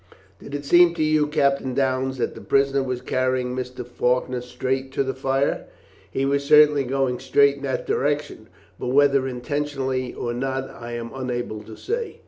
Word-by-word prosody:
"Did 140 - -8
it 145 0 -5
seem 175 +2 +6
to 160 - 0
you, 155 -1 +2
Captain 140 -3 +1
Downes, 130 -1 0
that - - -1
the - - -10
prisoner 140 0 +2
was 130 -2 -3
carrying 130 -1 -1
Mr. 125 -1 -5
Faulkner 125 +1 0
straight 130 +2 -3
to 140 - +1
the 135 0 -2
fire?" 135 +1 -1 0.4
"He 135 - -1
was 140 +1 +1
certainly 150 -1 +6
going 130 -1 0
straight 140 +2 +3
in - - -12
that 135 - -2
direction, 145 -6 -1 0.3
but - - -4
whether 140 0 +3
intentionally 130 -1 -2
or 120 - -4
not 135 +2 -3
I 120 0 -8
am 115 0 -5
unable 120 -4 -4
to 110 +1 -11
say." 465 +2 -4
135 Hz, 175 wpm, -23 LUFS, 125-140 Hz, 0.4 s, seem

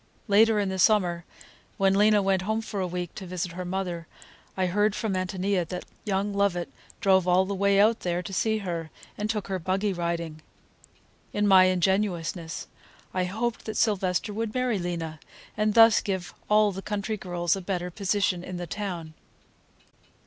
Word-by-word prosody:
Later 215 +1 +5
in 200 -2 0
the 190 0 -3
summer, 180 -4 +3 0.5
when 195 0 +3
Lena 210 0 +4
went 190 -1 +2
home 220 +4 -1
for 215 -2 -5
a 185 - 0
week 175 -1 -4
to 190 - -8
visit 180 -1 -3
her 180 +2 -5
mother, 180 -2 -3 0.5
I 185 - +2
heard 205 +3 +1
from 220 -3 -2
Ántonia 185 -1 -1
that 180 +2 -5 0.2
young 200 0 -1
Lovett 200 -3 0 0.3
drove 190 -2 +4
all 180 +1 +4
the 200 - -3
way 200 0 +3
out 220 +2 +4
there 175 0 -2
to 195 - -7
see 220 +3 +1
her, 165 -3 -3 0.3
and 210 +1 -3
took 215 -2 -1
her 190 -1 -2
buggy 190 +3 0
riding. 170 -2 -3 0.9
In 205 0 +1
my 190 -2 +7
ingenuousness 180 -3 0 0.5
I 185 -1 0
hoped 225 +5 -3
that 220 - -4
Sylvester 205 -1 +1
would 220 +1 -3
marry 250 -5 +1
Lena, 165 -3 -4 0.4
and 215 0 +1
thus 225 -1 +7
give 190 -5 -3 0.2
all 210 0 +5
the 195 0 -6
country 210 +2 -3
girls 175 -3 -1
a 195 - -5
better 180 -1 -3
position 195 -2 0
in 180 0 -6
the 175 - -4
town. 170 -3 -5
190 Hz, 175 wpm, -27 LUFS, 180-205 Hz, 0.9 s, my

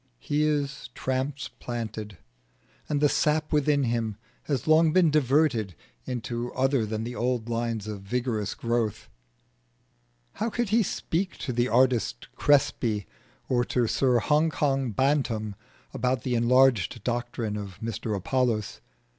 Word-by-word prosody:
He 145 - -1
is 145 -4 -1
transplanted, 120 - -4 0.7
and 145 -1 0
the 150 - +6
sap 150 +2 +1
within 150 -1 +3
him 115 -3 -1 0.3
has 135 -6 -1
long 155 0 +5
been 180 -4 +5
diverted 135 - +2 0.3
into 120 -1 -4
other 130 -3 +2
than 110 +1 -3
the 120 +2 -5
old 120 -2 -1
lines 115 -2 -2
of 105 -2 -6
vigorous 110 0 -2
growth. 115 -3 -2 1.3
How 225 - +1
could 235 0 -1
he 225 +3 +4
speak 185 -2 -2
to 125 - -4
the 120 +1 +1
artist 120 - +1
Crespi 115 -7 +2 0.4
or 120 -1 +2
to 125 -1 +1
Sir 125 +2 +2
Hong 150 +7 +3
Kong 135 -4 0
Bantam 115 -3 0 0.4
about 125 -1 0
the 125 - -1
enlarged 120 -3 +3
doctrine 120 -3 -2
of 100 -3 -6
Mr 110 -1 -3
Apollos? 115 0 -1
125 Hz, 130 wpm, -27 LUFS, 110-145 Hz, 1.3 s, the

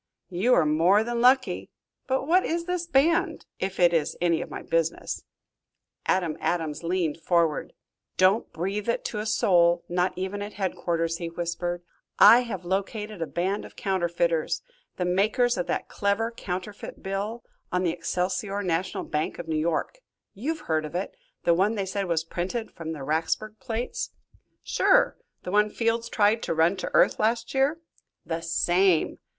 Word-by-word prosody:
"You 200 +8 +2
were 170 - +5
more 170 +8 +4
than 235 0 -2
lucky. 255 +2 +3 0.4
But 265 +1 0
what 360 +5 +4
is 335 +1 -1
this 360 -1 -2
band 335 +4 +2
if 190 0 -3
it 175 -1 +5
is 160 -3 0
any 170 -2 +2
of - - -6
my - - -7
business?" 165 0 -1 0.8
Adam 175 -4 +1
Adams 160 -4 -1
leaned 170 -2 -1
forward. 165 -4 +1 0.4
"Don't 190 +4 +3
breathe 195 +6 -3
it 235 - -1
to 210 - -3
a 215 - -3
soul, 175 -5 +3
not 180 +1 0
even 190 +2 -3
at 205 +1 -5
headquarters," 170 -4 -1
he 170 -1 -4
whispered. 175 +1 -3 0.3
"I 235 - +9
have 205 -8 -4
located 200 +2 -3
a 165 - -1
band 190 +4 -1
of - - -12
counterfeiters 170 -4 0 0.3
the 180 - -1
makers 215 +7 +2
of 180 - -2
that - - -2
clever 205 +3 0
counterfeit 195 -1 -6
bill 200 +5 -3 0.3
on 180 0 +1
the 175 - +2
Excelsior 185 +4 -2
National 180 0 -1
Bank 150 0 -2
of - - -7
New 160 - -1
York. 165 - -1 0.3
You've 305 +10 -3
heard 160 - 0
of 155 +2 -7
it 185 - -3 0.3
the 170 - +4
one 195 +6 +2
they 200 -2 -1
said 195 +1 -2
was 165 -2 +1
printed 185 +8 -4
from 160 -1 -6
the 145 -4 -7
Racksburg 165 +9 -1
plates." 250 - -3 0.5
"Sure, - - +3 0.3
the 180 - -5
one 210 +1 +4
Fields 230 +1 -1
tried 215 +1 +3
to 165 - -2
run 165 +4 +3
to - - -4
earth - - +4
last 230 +1 0
year." 275 +5 +1 0.4
"The 165 0 -3
same." 175 +1 +2
190 Hz, 165 wpm, -26 LUFS, 170-225 Hz, 0.8 s, I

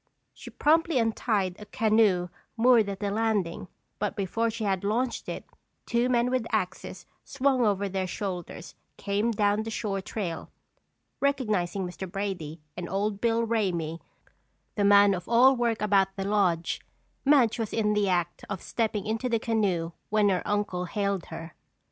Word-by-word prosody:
She - - -11
promptly 325 0 +2
untied 215 -5 0
a 210 - -10
canoe 210 -5 +2 0.3
moored 230 -3 +5
at 195 0 -6
the 200 -1 -1
landing 210 -4 -1 0.3
but 210 -1 -2
before 225 +4 0
she 225 -1 -4
could 195 -2 0
launch 235 +5 -1
it - - -5 0.4
two 240 +1 +1
men 245 0 +2
with 255 -3 0
axes 185 -3 -3 0.2
swung 270 -2 +1
over 200 -2 +1
their 190 -1 -2
shoulders 180 -3 -5 0.2
came 205 +3 0
down 205 -1 +1
the 220 - -5
shore 205 -3 -2
trail. 185 -5 -5 0.7
Recognizing 215 -10 0
Mr. 180 +1 -7
Brady 180 -6 -4 0.2
and 175 -1 -5
Old 200 +1 -1
Bill 230 0 +2
Ramey, 175 -8 -1 0.7
the 205 - 0
man 200 0 +6
of 180 -1 -5
all 250 +3 +6
work 235 -3 0
about 195 -2 +2
the 195 -1 -3
lodge, 180 -5 +1 0.4
Madge 265 -6 +4
was 225 -2 -2
in 210 -2 +1
the 205 -2 +1
act 175 -1 -1
of 190 - -5
stepping 220 -3 -1
into 225 +4 -1
the 230 - +2
canoe 200 -7 0 0.2
when 210 -1 +3
her 185 -2 +1
uncle 205 -3 -1
hailed 200 -1 -2
her. 165 0 -8
205 Hz, 160 wpm, -27 LUFS, 190-225 Hz, 0.7 s, man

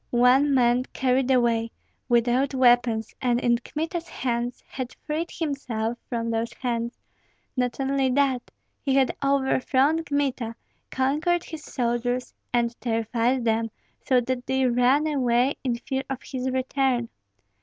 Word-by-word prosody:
One 255 +4 +4
man 245 0 +3
carried 260 0 +1
away, 235 -3 +2 0.4
without 245 +3 +2
weapons, 240 -3 +3
and 245 -2 +2
in 240 -1 +2
Kmita's 325 +6 -4
hands, 240 -1 -2
had 255 -2 -6
freed 315 +3 -2
himself 250 -8 -3
from 230 -2 -2
those 225 +1 -1
hands; 235 -1 -3 0.6
not 250 -1 -1
only 270 0 +1
that, 260 -1 +1 0.3
he 270 -2 +1
had 270 -1 +3
overthrown 275 +2 +2
Kmita, 270 -6 -1 0.3
conquered 300 +7 +1
his 320 -2 -8
soldiers, 245 0 -1 0.2
and 235 -1 +1
terrified 235 +2 0
them 225 0 +1 0.3
so 255 -2 +3
that 250 0 -3
they 265 0 +2
ran 250 +4 +3
away 260 -3 +2
in 250 -3 0
fear 265 +2 -3
of 270 -1 -4
his 260 0 -3
return. 260 -2 0
255 Hz, 135 wpm, -25 LUFS, 240-270 Hz, 0.6 s, One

